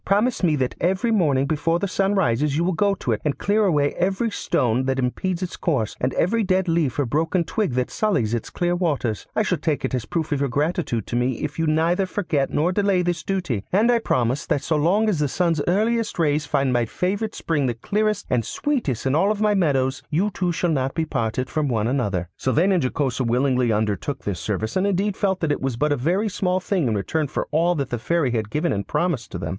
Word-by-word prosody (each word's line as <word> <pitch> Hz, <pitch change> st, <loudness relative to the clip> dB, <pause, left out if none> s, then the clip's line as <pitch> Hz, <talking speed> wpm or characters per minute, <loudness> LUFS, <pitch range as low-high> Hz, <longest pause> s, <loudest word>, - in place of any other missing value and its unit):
Promise 215 Hz, +5 st, +1 dB
me 165 Hz, -5 st, +3 dB
that 130 Hz, -3 st, -1 dB
every 190 Hz, +7 st, +1 dB
morning 145 Hz, -10 st, +2 dB
before 160 Hz, +3 st, 0 dB
the 200 Hz, -, -2 dB
sun 195 Hz, +2 st, 0 dB
rises 145 Hz, -3 st, +1 dB
you 165 Hz, -, +1 dB
will 185 Hz, +2 st, +1 dB
go 200 Hz, +4 st, +2 dB
to 125 Hz, -, -3 dB
it 110 Hz, -, -1 dB
and 150 Hz, -2 st, -1 dB
clear 210 Hz, +1 st, +2 dB
away 145 Hz, -6 st, +2 dB
every 195 Hz, +5 st, 0 dB
stone 125 Hz, -, 0 dB
that 135 Hz, 0 st, 0 dB
impedes 170 Hz, +8 st, -1 dB
its 180 Hz, -, -4 dB
course, 130 Hz, -, -1 dB
and 125 Hz, -, +1 dB
every 225 Hz, +6 st, +2 dB
dead 190 Hz, -1 st, +1 dB
leaf 165 Hz, -6 st, +1 dB
or 145 Hz, -, +1 dB
broken 160 Hz, +7 st, 0 dB
twig 190 Hz, -, -1 dB
that 125 Hz, 0 st, -1 dB
sullies 185 Hz, -, 0 dB
its 120 Hz, -, -2 dB
clear 175 Hz, 0 st, 0 dB
waters. 145 Hz, -, -1 dB
I 215 Hz, -, +2 dB
shall 180 Hz, -5 st, 0 dB
take 155 Hz, -3 st, -1 dB
it -, -, -3 dB
as 125 Hz, -3 st, -1 dB
a -, -, -26 dB
proof 160 Hz, -2 st, -2 dB
of 145 Hz, -, +1 dB
your 140 Hz, -1 st, 0 dB
gratitude 145 Hz, -, -1 dB
to -, -, -4 dB
me 125 Hz, +2 st, +1 dB
if 150 Hz, +1 st, -4 dB
you 165 Hz, -, +1 dB
neither 170 Hz, +5 st, +2 dB
forget 160 Hz, -8 st, -1 dB
nor 160 Hz, +4 st, +1 dB
delay 195 Hz, -2 st, +2 dB
this 175 Hz, -2 st, -1 dB
duty, 175 Hz, -, -2 dB
and 215 Hz, +6 st, +4 dB
I 235 Hz, -, +3 dB
promise 125 Hz, -, 0 dB
that 140 Hz, -, 0 dB
so 155 Hz, -, 0 dB
long 180 Hz, +9 st, +2 dB
as 195 Hz, -8 st, +1 dB
the 150 Hz, -, +2 dB
sun's 165 Hz, +1 st, 0 dB
earliest 220 Hz, +5 st, +1 dB
rays 150 Hz, -2 st, +1 dB
find 135 Hz, -3 st, +1 dB
my 120 Hz, -1 st, +2 dB
favourite 200 Hz, -, -2 dB
spring 145 Hz, -5 st, 0 dB
the 120 Hz, -, -1 dB
clearest 210 Hz, -, -1 dB
and 125 Hz, -2 st, +1 dB
sweetest 235 Hz, -, -2 dB
in 130 Hz, -, +1 dB
all 190 Hz, +7 st, +3 dB
my 210 Hz, 0 st, +2 dB
meadows, 135 Hz, -8 st, +1 dB
you 185 Hz, +7 st, +1 dB
two 180 Hz, -3 st, -1 dB
shall 170 Hz, 0 st, 0 dB
not 135 Hz, -3 st, -1 dB
be 165 Hz, -, 0 dB
parted 125 Hz, -2 st, -2 dB
from 155 Hz, -2 st, -1 dB
one 110 Hz, -5 st, 0 dB
another.' 105 Hz, -9 st, -1 dB
Sylvain 160 Hz, +9 st, +2 dB
and 185 Hz, -3 st, +2 dB
Jocosa 130 Hz, 0 st, -1 dB
willingly 125 Hz, 0 st, +2 dB
undertook 110 Hz, +6 st, -1 dB
this 95 Hz, -4 st, -3 dB
service, 105 Hz, +3 st, -3 dB
and 190 Hz, +2 st, +2 dB
indeed 200 Hz, +1 st, 0 dB
felt 190 Hz, -2 st, 0 dB
that 160 Hz, -3 st, +1 dB
it -, -, -1 dB
was 135 Hz, -3 st, -2 dB
but 150 Hz, +4 st, +1 dB
a -, -, +3 dB
very 175 Hz, -, 0 dB
small 185 Hz, -2 st, 0 dB
thing 185 Hz, -6 st, 0 dB
in 110 Hz, -, 0 dB
return 145 Hz, +10 st, -1 dB
for -, -, -3 dB
all 170 Hz, +3 st, +2 dB
that 140 Hz, -4 st, -3 dB
the 120 Hz, -, -2 dB
fairy 160 Hz, +1 st, 0 dB
had 110 Hz, -3 st, -2 dB
given 155 Hz, +8 st, 0 dB
and 100 Hz, -1 st, -3 dB
promised 170 Hz, -10 st, -1 dB
to -, -, -3 dB
them. 80 Hz, -, -4 dB
155 Hz, 240 wpm, -23 LUFS, 130-185 Hz, -, and